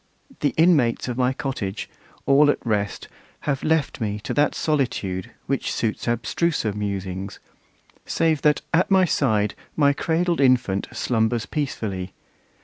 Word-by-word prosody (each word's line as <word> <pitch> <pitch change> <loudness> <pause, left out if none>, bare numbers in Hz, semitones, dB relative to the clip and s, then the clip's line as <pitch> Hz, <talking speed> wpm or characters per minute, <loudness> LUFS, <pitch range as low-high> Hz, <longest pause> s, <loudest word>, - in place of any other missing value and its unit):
The 145 - 0
inmates 155 -10 +3
of 125 - -2
my 125 0 +2
cottage, 120 -7 -4 0.4
all 145 +2 +5
at - - +3
rest, 105 -3 -1 0.3
Have 140 -2 -1
left 155 -5 0
me 105 -1 -2
to - - -4
that 145 0 +2
solitude, 120 - -1 0.2
which - - -1
suits 110 +1 -2
Abstruser 120 +1 0
musings: 100 -2 -4 0.7
save 160 -3 +1
that 150 -2 +3
at 175 +3 +3
my 190 -1 +5
side 110 - +1 0.2
My 145 -2 +4
cradled 170 +2 0
infant 125 -7 +2
slumbers 115 0 0
peacefully. 100 - -3
125 Hz, 135 wpm, -23 LUFS, 105-150 Hz, 0.7 s, all